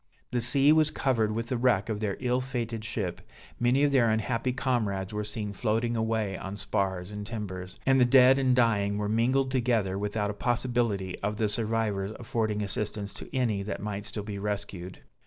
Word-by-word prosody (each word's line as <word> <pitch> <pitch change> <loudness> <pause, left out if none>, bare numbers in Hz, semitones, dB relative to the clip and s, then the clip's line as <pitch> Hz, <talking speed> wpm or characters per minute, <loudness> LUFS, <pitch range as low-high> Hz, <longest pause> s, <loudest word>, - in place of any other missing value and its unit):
The 120 - 0
sea 135 +4 +4
was 155 -1 +4
covered 115 -8 0
with 115 +2 -3
the 130 - 0
wreck 120 -4 +2
of 110 -2 -2
their 105 -2 -2
ill 125 +1 0
fated 120 -4 -4
ship, 105 -5 -3 0.4
many 125 +4 +3
of 145 - +3
their 125 -4 +4
unhappy 115 +3 0
comrades 110 -7 -1
were 105 0 -2
seen 105 -1 -4
floating 115 +3 0
away 110 -3 -1
on 95 +2 -6
spars 95 -2 -2
and 105 0 -5
timbers; 95 -4 -6
and 135 -1 +4
the - - +7
dead 130 +1 +6
and 130 -2 +3
dying 105 -4 +2
were 105 0 -1
mingled 130 +5 +1
together 115 -7 +1
without 105 0 -1
a - - -6
possibility 115 -4 -1
of 105 +1 -2
the 110 - +1
survivors 105 -2 -1
affording 110 -3 -1
assistance 100 0 +2
to - - -9
any 115 -6 0
that 100 0 -4
might 105 0 -4
still 105 - -4
be 100 -1 -5
rescued. 100 -3 -5
110 Hz, 190 wpm, -28 LUFS, 100-125 Hz, 0.4 s, the